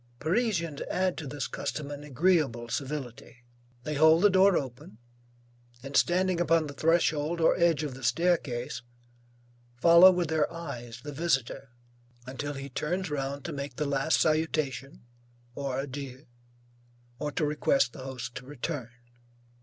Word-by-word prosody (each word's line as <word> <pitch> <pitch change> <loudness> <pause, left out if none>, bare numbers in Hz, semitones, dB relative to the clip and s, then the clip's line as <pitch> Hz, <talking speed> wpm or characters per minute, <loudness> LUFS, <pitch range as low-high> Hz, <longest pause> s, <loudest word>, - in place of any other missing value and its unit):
Parisians 170 - -1
add 185 -1 0
to 150 - -6
this 140 +1 -4
custom 145 -1 -4
an 145 0 -7
agreeable 145 -5 +1
civility; 130 -3 -5 0.4
they 150 - -3
hold 160 +4 +5
the 205 - +6
door 190 0 +5
open, 130 -3 -6 0.9
and 135 +1 -7
standing 180 0 +2
upon 165 -1 +3
the 145 - -7
threshold 160 +1 +1
or 165 - +4
edge 165 -3 +3
of 145 -3 -4
the 130 - -11
staircase, 130 -2 0 0.9
follow 170 +8 +8
with 175 -3 0
their 160 -1 +1
eyes 125 -8 -7
the 145 - -6
visitor 135 -4 -1 0.6
until 140 +3 -5
he 135 0 -6
turns 175 +6 -3
round 140 0 -3
to 170 - -4
make 140 -2 -5
the 150 - -2
last 140 +2 +1
salutation 155 -5 -1 0.5
or 135 0 -3
adieu, 135 0 -6 0.9
or 150 0 -2
to 155 - 0
request 140 -4 +1
the - - -9
host 130 -3 -6
to - - -7
return. 135 -1 -5
145 Hz, 145 wpm, -28 LUFS, 135-165 Hz, 0.9 s, follow